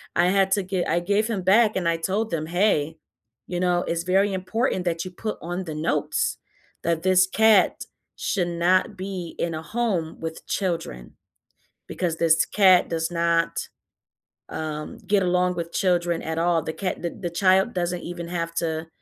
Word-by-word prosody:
I 175 - +4
had 195 +1 +2
to 200 0 +2
gi 185 -1 -1
I 165 +2 +1
gave 205 +5 +1
him 210 -5 -2
back 210 +4 +4
and 180 -3 0
I 165 0 +2
told 195 +6 -2
them, 155 -2 -2
"Hey, 165 -4 +1 0.5
you 175 - -3
know, 180 -1 +1
it's 170 0 -1
very 195 +2 +2
important 190 +1 -1
that 170 0 -1
you 185 - -7
put 215 +4 -5
on 175 +2 -4
the 155 -2 -5
notes 150 -1 -1 0.5
that 165 0 0
this 185 0 +4
cat 220 0 +3 0.3
should 180 -4 -1
not 185 +5 +1
be 185 -3 -6
in 170 -1 -1
a 155 - -4
home 190 -4 -2
with 160 0 -6
children 165 - -3 0.7
because 170 -3 -2
this 160 -2 +3
cat 190 -3 +4
does 165 0 -2
not, 170 -1 0 0.8
um, 155 -1 -5
get 205 -2 +1
along 180 0 +1
with 170 -1 -4
children 175 -3 +1
at 160 0 -4
all. 170 0 +2
The 160 - -5
cat 185 +1 -3
the 170 - -2
the 175 -1 -6
child 190 +5 +3
doesn't 175 -1 -2
even 170 -1 -6
have 170 -1 -3
to 160 -1 -2
175 Hz, 175 wpm, -24 LUFS, 165-190 Hz, 0.8 s, I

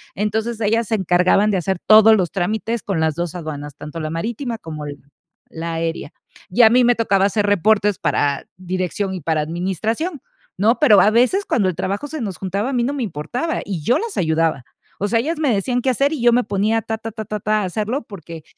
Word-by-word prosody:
entonces, 220 +3 -2
ellas 225 +1 +1
se 225 - +2
encargaban 185 +2 +3
de 195 - +1
hacer 190 +1 -1
todos 220 0 +8
los 180 -4 -1
trámites 220 +4 -2
con 195 -5 -2
las 160 -1 +1
2 170 -1 -3
aduanas, 145 -4 -6
tanto 155 +2 -7
la 155 - -3
marítima 230 - -3
como 155 -6 -8 0.7
la 165 0 -5
aérea 165 0 -3 0.4
y 235 +7 +4
a 220 - +8
mí 250 +1 +5
me 245 0 +4
tocaba 200 -4 +2
hacer 205 +1 +1
reportes 205 0 +2
para 140 -1 0
dirección 185 +1 -3
y 185 - -5
para 155 +1 0
administración, 195 - -3 0.4
¿no? 220 +6 +2
Pero, 230 -10 +6
a 210 - +4
veces 255 - +2
cuando 195 -5 +1
el 180 - -4
trabajo 200 - -3
se 310 -1 -6
nos 195 -6 -4
juntaba, 195 +7 -2
a - - -4
mí 245 -2 +1
no 270 +4 -1
me 280 -3 -2
importaba 220 - -3
y 190 -6 -4
yo 245 - +3
las 455 -2 -5
ayudaba, 160 -4 +1 0.4
o 205 - 0
sea, 230 +2 +2
ellas 310 +8 -2
me 290 -6 +2
decían 245 +5 0
qué 260 - 0
hacer 275 +5 +1
y 295 - -4
yo 240 0 +5
me 245 +1 +3
ponía 210 +3 0
ta 220 +1 -4
ta 225 0 -7
ta 220 0 -6
ta 210 +1 -4
ta, 215 +1 +1
a - - -1
hacerlo 215 +8 -2
porque 165 -5 -10
205 Hz, 225 wpm, -20 LUFS, 175-230 Hz, 0.7 s, todos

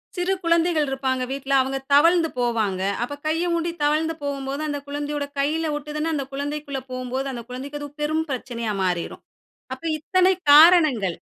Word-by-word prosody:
சிறு 360 +1 0
குழந்தைகள் 335 -3 +2
இருப்பாங்க 265 -1 -1
வீட்டில. 275 0 -3
அவங்க 265 +1 -2 0.2
தவழ்ந்து 330 +3 +5
போவாங்க. 220 -6 0 0.2
அப்ப 285 +4 -5
கைய 325 +3 0
ஊண்டி 335 0 -1
தவழ்ந்து 310 +2 +1
போகும்போது, 280 0 -3
அந்த 290 -1 -3
குழந்தையோட 290 0 -3
கையில 310 +3 0
ஒட்டுதுனு, 300 +2 -3
அந்த 280 -3 -2
குழந்தைக்குள 285 -1 -4
போகும்போது 255 +2 -3
அந்த 235 -2 -6
குழந்தைக்கு 275 +4 -6
அது 290 - -6
பெரும் 310 +2 0
பிரச்சனையா 235 -4 -3
மாறிறும். 180 -2 -2 0.5
அப்ப 260 - -18 0.2
இத்தனை 370 +4 +3 0.2
காரணங்கள். 300 - +6
285 Hz, 150 wpm, -23 LUFS, 260-315 Hz, 0.5 s, காரணங்கள்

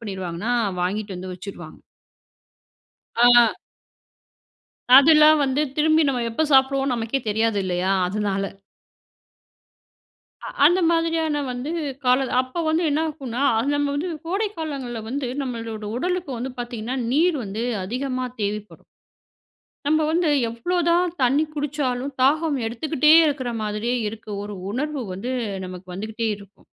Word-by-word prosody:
பண்ணிருவாங்கன்னா 190 0 -4 0.3
வாங்கிட்டு 200 +2 -2
வந்து 185 +1 -6
வச்சுடுவாங்க. 180 -3 -10 1.4
ஆ. 240 -2 +7 1.4
அதெல்லாம் 305 +2 +7
வந்து 270 +1 0 0.2
திரும்பி 315 +1 +4
நம்ம 250 -3 0
எப்போ 270 +8 0
சாப்பிடுவோனு, 270 0 +3
நமக்கே 230 +3 -2
தெரியாது 220 0 +1
இல்லையா. 185 +1 0 0.2
அதனால. 200 0 -2 1.9
அ - - -5 0.2
அந்த 350 +5 +5
மாதிரியான 325 -3 0
வந்து 250 +4 -4 0.3
காலம். 255 +1 +2
அப்போ 255 +6 -5
வந்து 320 +2 +1
என்னாக்குன்னா, 285 -4 -2 0.3
நம்ம 290 0 +1
வந்து 340 +5 -2 0.2
கோடை 395 +5 0
காலங்கள்ல 270 -7 -4
வந்து 265 +1 -3
நம்மளோட 230 -4 -5
உடலுக்கு 360 +1 -2
வந்து 255 +2 -4
பார்த்தீங்கன்னா, 240 0 -4 0.2
நீர் 325 +4 +3
வந்து 210 +4 -4 0.2
அதிகமா 255 +4 -3 0.2
தேவைப்படும். 210 +1 -4 1.0
நம்ம 310 +2 +3
வந்து 335 0 +1 0.2
எவ்ளோ 235 +11 -3
தான் 350 +1 +3
தண்ணி 270 +4 +3
குடிச்சாலும், 280 -3 -2
தாகம் 305 +4 +3
எடுத்துக்கிட்டே 300 +6 +1
இருக்கிற 275 -5 -1
மாதிரியே 215 +4 -1
இருக்கு. 215 0 -9
ஒரு 205 0 -6 0.2
உணர்வு 290 +5 -3
வந்து 195 +7 -5 0.3
நமக்கு 180 0 -9
வந்துகிட்டே 220 +4 -3
இருக்கும். 200 0 -18
255 Hz, 120 wpm, -23 LUFS, 215-300 Hz, 1.9 s, ஆ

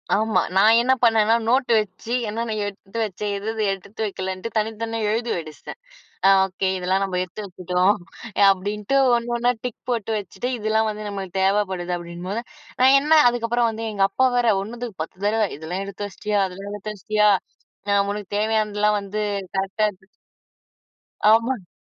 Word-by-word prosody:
ஆமா. 220 +2 +2
நான் 215 +4 +6
என்ன 255 +2 +3
பண்ணேன்னா 225 -1 +4
நோட்டு 255 +1 +2
வெச்சு 210 +2 -6 0.2
என்னென்ன 225 +1 -3
எடுத்து 200 +1 -8
வச்சேன். 210 0 -3
எது 200 +2 -7
எது 220 -1 -2
எடுத்து 195 +3 -6
வெக்கலன்ட்டு, 190 +1 -4
தனித்தனியா 225 +1 -2
எழுதி 230 +2 -1
வச்சுட்டேன். 155 - -9 0.5
அ, - - +8 0.2
"ஓகே 190 0 -2
இதெல்லாம் 185 +2 0
நம்ம 185 -2 -2
எடுத்து 185 +4 -7
வெச்சுட்டோம்," 185 +1 +1 0.4
அ - - +3
அப்டின்ட்டு 205 +6 -2 0.2
ஒன்னு 235 0 -3
ஒன்னா 240 +1 +2
டிக் 250 -3 -4
போட்டு 225 -3 -2
வெச்சுட்டு, 205 +4 -5
இதெல்லாம் 220 0 +1
வந்து 210 0 -6
நம்மளுக்கு 195 -2 -5
தேவப்படுது 190 -3 0
அப்டின்னும்போது, 175 +5 -5 0.4
நான் 265 +2 +7
என்ன 305 +2 +5
அதுக்கப்புறம் 240 0 +1
வந்து 225 0 -5
எங்க 200 -2 +2
அப்பா 260 +6 +2
வேற 240 -1 +3
1 230 +4 -8
துக்கு 220 -8 -6
10 165 - -9
தடவ, 220 +1 +2
இதெல்லாம் 165 +5 -4
எடுத்து 200 +1 -5
வெச்சுட்டியா, 205 +1 -2
அதெல்லாம் 195 +2 -8
எடுத்து 205 +1 -5
வெச்சுட்டியா? 210 +1 +2 0.6
நான் 200 0 +3
உனக்கு 205 -2 -6
தேவயானதெல்லாம் 210 -1 +1
வந்து 200 +1 -6 0.4
கரெக்ட்டா 195 +3 0
எடுத்துட்டு 190 -1 -22 1.2
ஆமாங் 230 -3 +2
210 Hz, 160 wpm, -23 LUFS, 190-225 Hz, 1.2 s, அ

